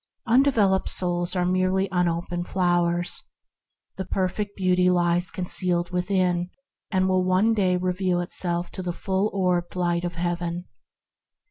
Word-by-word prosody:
Undeveloped 230 -6 +3
souls 175 0 0
are 180 -1 +1
merely 185 +1 +1
unoped 175 0 -1
flowers. 175 -1 +1 0.8
The 190 - -4
perfect 195 +2 -2
Beauty 180 -1 +2
lies 175 0 +2
concealed 180 -1 0
within, 180 -1 0 0.4
and 185 -2 +1
will 185 -1 +2
one 185 +5 +2
day 185 -4 +2
reveal 180 0 0
itself 175 0 -2
to 190 - -6
the 180 -1 -3
full 190 +3 -1
orbed 180 -3 -1
light 175 -1 0
of 175 -1 -4
Heaven. 175 0 -3
180 Hz, 130 wpm, -24 LUFS, 175-190 Hz, 0.8 s, Undeveloped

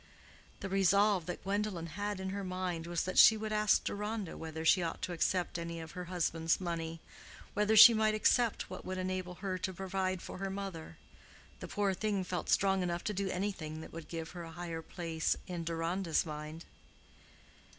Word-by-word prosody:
The - - -3
resolve 195 -1 +3
that 180 - -5
Gwendolen 200 -3 -1
had 205 +4 -4
in 190 0 -3
her 200 +1 -3
mind 185 -3 -3
was 170 -1 -1
that 185 - +1
she 220 - +9
would 215 0 -3
ask 210 -1 +3
Deronda 210 -2 -3
whether 160 0 -6
she 180 +3 +5
ought 165 -1 -3
to 180 - -2
accept 175 +1 0
any 170 0 -5
of 160 -1 -8
her 180 -1 -6
husband's 165 -2 0
money—whether 170 +5 -3
she 220 +2 +11
might 215 -1 +2
accept 230 +1 +2
what - - -8
would 185 0 -4
enable 185 -1 -3
her 185 -1 -1
to 190 - -2
provide 190 -1 -2
for - - -7
her 195 0 -2
mother. 190 -4 -6 0.6
The - - -6
poor 200 -2 0
thing 200 0 -1
felt 180 -1 -4
strong 195 -1 +3
enough 175 -1 -2
to 210 - -1
do 195 0 -1
anything 180 -5 -3
that - - -11
would 165 -1 -8
give 165 -1 -5
her 175 - -7
a 165 - -7
higher 170 -1 -5
place 165 -1 -2
in 175 -2 -4
Deronda's 165 +1 0
mind. 155 +1 -7
185 Hz, 185 wpm, -33 LUFS, 165-195 Hz, 0.6 s, she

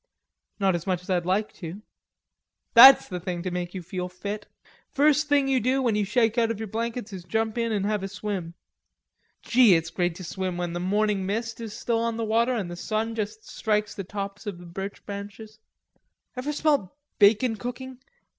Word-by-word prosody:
"Not 195 -2 +3
so 190 - -6
much 180 -1 -1
as 185 - -5
I'd 175 -1 0
like 205 +3 0
to." 180 +5 -7 0.9
"That's 265 +3 +10
the 180 -2 -5
thing 175 -1 -4
to 185 - -3
make 180 +1 -4
you 185 - -5
feel 180 +1 -4
fit. 200 +3 -6 0.4
First 295 +1 +3
thing 285 -2 +3
you 265 -1 +2
do 255 +4 +1
when 235 -3 +2
you 210 -1 +1
shake 225 +3 +2
out 230 -1 +2
of 230 - -2
your 220 -2 -5
blankets 230 0 -4
is 185 -2 -7
jump 220 +3 -1
in 230 -1 -1
an' 205 -3 0
have 210 0 0
a 195 - -3
swim. 195 -4 -5 0.9
Gee, 235 -6 +6
it's 165 0 -1
great 175 -2 -1
to 185 - -9
swim 185 0 -3
when 175 -1 -3
the 175 - -3
morning 200 +1 0
mist 225 +3 -3
is 220 -1 -6
still 235 -2 0
on 230 0 -1
the 230 - -2
water 230 +3 +2
an' 205 -6 -2
the 175 - -6
sun 220 +5 -2
just 215 0 -5
strikes 210 -1 -1
the 195 - -5
tops 200 +2 -6
of 200 -4 -4
the 175 - -12
birch 190 +4 -7
trees. 205 +2 -8 0.8
Ever 255 +4 -3
smelt 290 - +1 0.3
bacon 220 +3 +5
cooking? 250 +3 -7
210 Hz, 200 wpm, -26 LUFS, 185-230 Hz, 0.9 s, That's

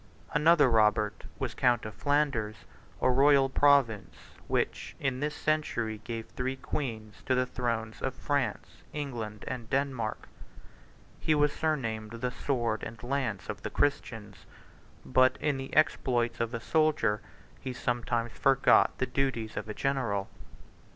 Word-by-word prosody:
Another 150 0 +5
Robert 105 -2 +2
was - - -3
count 120 -2 +2
of 110 - -6
Flanders, 110 -1 0 0.4
a 130 - +5
royal 135 +1 +5
province, 135 -7 +3 0.3
which, - - -1
in 135 -2 -1
this 150 +1 -2
century, 120 -8 -1
gave 115 -2 -5
three 130 +1 -3
queens 110 -6 -5
to 130 - +3
the 125 0 +2
thrones 115 -3 -3
of 135 -1 -2
France, 140 -7 -2
England, 115 -8 -5
and 120 -3 -5
Denmark: 130 -5 -1 0.9
he 155 - +2
was 150 -1 +3
surnamed 115 -9 -2
the 125 +2 -2
Sword 120 -4 -1
and 110 +1 -8
Lance 125 -6 -2
of - - -5
the - - -4
Christians; 110 - -2 0.6
but 130 0 +4
in 145 -2 0
the 135 0 -6
exploits 120 -6 +2
of 115 -1 -1
a - - -2
soldier 145 -6 +2 0.4
he 130 - -5
sometimes 120 -1 -1
forgot 135 +1 +4
the 130 - +1
duties 125 -4 -2
of - - -4
a - - -3
general. 115 -8 -1
125 Hz, 140 wpm, -30 LUFS, 110-140 Hz, 0.9 s, Another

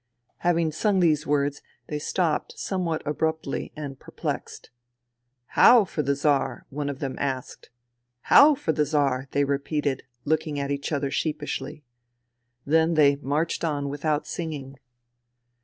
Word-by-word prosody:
Having 170 -2 +1
sung 195 +5 +1
these 155 -3 +2
words 145 0 0 0.2
they 150 - -4
stopped 165 0 -1
somewhat 175 -5 -2
abruptly 160 -1 -2
and 140 -3 -7
perplexed. - - -6 0.4
" 120 +1 -53
How 235 -4 +8
for 160 - -3
the 140 0 0
Czar? 140 -3 0
'* - - -46
one 145 +1 -3
of 140 - -4
them 135 -2 -3
asked. 130 -2 -4 0.3
" 120 0 -54
How 295 +1 +9
for 265 - -1
the 155 -1 +1
Czar? 140 -3 0
'* - - -46
they 145 - +2
repeated, 140 0 -1 0.2
looking 155 -1 0
at 140 0 -2
each 140 +2 -3
other 140 -2 -1
sheepishly. 150 0 -3 0.8
Then 160 +3 +3
they 140 -2 +5
marched 150 +5 -1
on 145 -3 -1
without 145 +1 -1
singing. 140 -5 -6
145 Hz, 150 wpm, -25 LUFS, 140-160 Hz, 0.8 s, How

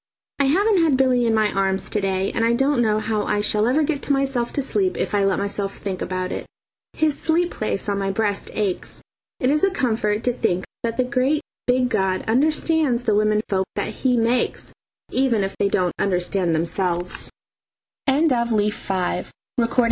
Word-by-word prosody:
I 280 - +3
haven't 385 +7 +3
had 310 -5 +3
Billy 250 -2 +3
in 225 - +2
my 215 -1 +2
arms 195 0 0
to 210 - 0
day, 195 0 0
and 225 - -1
I 230 +1 +3
don't 270 +1 +2
know 215 -2 +2
how 215 -1 -1
I 205 0 0
shall 210 +1 +1
ever 285 +5 +3
get 295 -2 -2
myself 275 -3 +1
to 280 - 0
sleep 370 +7 0
if - - -2
I 205 -1 +2
let 195 -2 +2
myself 200 0 -2
think 190 -3 -5
about 185 0 -3
it. - - -4 0.5
His 310 -2 +1
sleep 340 +2 +1
place 215 -1 -3
on 200 -1 0
my 195 0 -1
breast 205 0 -1
aches. 200 -4 -2 0.4
It 255 - +1
is 300 +1 +1
a 390 - +5
comfort 225 - 0
to 245 - +1
think 185 -5 0 0.2
that 230 -1 -2
the 255 - +3
great 270 +4 +1 0.3
big 250 0 +2
God 190 -4 0
understands 295 +1 +2
the 220 -3 +2
women 215 0 +2
folk 190 -1 0
that - - -2
He 250 +3 0
makes, 235 +2 0 0.4
even 250 -6 +2
if 195 - -3
they 200 - +1
don't 180 -3 +1
understand 180 -2 +1
themselves. 175 +2 -1 0.8
Leaf 235 -8 +1
VI. 185 -2 -1 0.3
Conflagration. 230 +1 0
225 Hz, 185 wpm, -22 LUFS, 195-265 Hz, 0.8 s, a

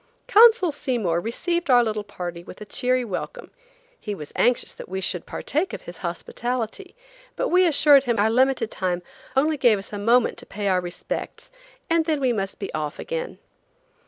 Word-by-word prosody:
Consul 445 -5 +6
Seymour 225 - -1
received 340 - -2
our 245 -2 +6
little 215 -2 -2
party 175 -4 -7
with 180 - -12
a 210 - -8
cheery 250 +3 0
welcome. 235 - -6 0.5
He 210 -2 -5
was 150 -5 -10
anxious 245 0 +2
that - - -11
we 190 +1 -3
should 180 -2 -3
partake 335 +6 -2
of - - -6
his 175 0 -10
hospitality, 240 - -4 0.4
but - - -1
we 365 0 +4
assured 285 -3 +5
him 240 -2 +1
our 215 +2 +3
limited 255 -2 +2
time 180 -2 -2 0.3
only 300 +3 +2
gave 240 -5 +4
us 195 +2 -9
a 205 - -4
moment 235 +4 +2
to - - -12
pay 205 0 -4
our 185 -1 +2
respects, 175 0 -6 0.4
and 330 -2 +2
then 310 -3 0
we 255 -3 +1
must 195 -3 -3
be 195 - -6
off 150 -1 -3
again. - - -5
235 Hz, 185 wpm, -24 LUFS, 195-295 Hz, 0.5 s, Consul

